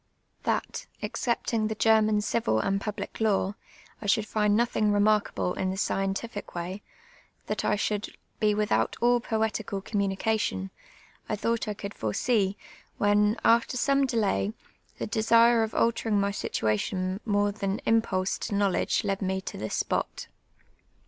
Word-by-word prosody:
Tliat, - - -2 0.2
oxeeptinp; 230 -2 -1
the 220 - -2
(Jerman 215 -1 +4
eivil 210 - +1
and 195 0 0
public 210 0 -5
law, 200 -2 +2 0.5
i 210 - -5
should 210 +2 +3
find 210 -1 +2
nothing; 225 -3 +2
remarkable 205 -3 +2
in 185 - -2
the 190 - -2
seientiiie 195 +2 -2
way, 180 +4 -4 0.7
tiuit - - -2
I 210 - +2
should 210 0 -2 0.2
be 210 -2 +3
without 210 0 +1
all 240 0 +3
j)oelieal 220 -1 -1 0.2
eomnmniealion, 200 - -1 0.6
I - - +1
tliou^ht 230 +2 -1
I 210 - -2
could 200 0 -6
fore 110 -1 -3
Bcc, 205 - +1 0.4
when, 210 +2 +3
after 235 +2 +3
some 275 +2 +2
delay, 215 -3 0 0.4
the - - -3
desire 230 +2 +4
of 220 -1 -1
alterinj"; 230 -1 +1
my 200 0 +1
situation 185 - -1
more 205 -1 +1
than 195 -1 -2
im])ulsc 195 -5 +1
to 205 - -3
knowledge 200 -2 +1
led 195 -2 -1
me 190 0 0
to - - -7
this 110 0 -4
spot. - - -2
210 Hz, 145 wpm, -27 LUFS, 195-220 Hz, 0.7 s, Jerman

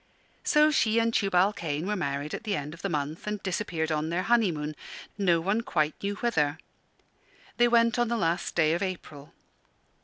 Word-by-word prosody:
So 300 0 +4
she 225 -6 +2
and 230 0 +2
Tubal 195 -1 +3
Cain 155 -2 -3
were 210 +2 -1
married 145 -4 -3
at - - -5
the 210 -3 -1
end 150 -1 -5
of 170 - -12
the 195 - -2
month, 150 +3 -3
and 210 0 -1
disappeared 170 -4 -2
on 155 +1 -1
their 175 +2 -1
honeymoon, 175 -11 +1 0.4
no 180 -5 +2
one 200 +7 0
quite 155 -9 0
knew 200 +1 -2
whither. 160 -11 0 1.0
They 240 0 +5
went 235 0 +3
on 240 - +2
the 235 +1 -1
last 170 -3 -1
day 160 -2 +3
of 170 - -1
April. 155 -7 -6
180 Hz, 185 wpm, -28 LUFS, 155-215 Hz, 1.0 s, They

